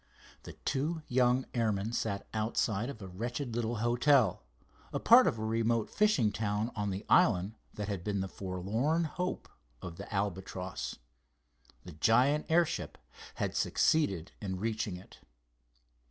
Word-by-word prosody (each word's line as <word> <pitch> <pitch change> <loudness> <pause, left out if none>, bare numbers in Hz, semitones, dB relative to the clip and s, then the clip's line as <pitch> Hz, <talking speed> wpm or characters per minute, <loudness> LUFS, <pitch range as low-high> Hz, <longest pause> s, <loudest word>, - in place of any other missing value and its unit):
The - - -10
two 155 +4 -2
young 125 +1 +2
airmen 110 -2 0
sat 100 -4 -2
outside 110 +1 0
of 110 -7 -8
a - - -6
wretched 120 +6 -4
little 120 0 -1
hotel, 120 -3 +3 0.5
a - - -2
part - - +7
of - - +1
a 110 - -3
remote 115 0 0
fishing 200 - +3
town 105 +2 -1
on 105 -2 -1
the 95 +1 -4
island 90 +4 +4 0.2
that 105 -1 -4
had 100 -4 -3
been 100 0 -1
"the 95 - -2
forlorn 100 - -1
hope" 180 +3 -3 0.3
of 85 -1 -8
the - - -9
Albatross. 95 -2 -3 0.9
The 90 - -8
giant 125 - +3
airship 170 0 +1 0.4
had - - -2
succeeded 100 - +1
in 95 -3 -3
reaching 110 -3 -2
it. 90 - -15
110 Hz, 140 wpm, -31 LUFS, 100-125 Hz, 0.9 s, part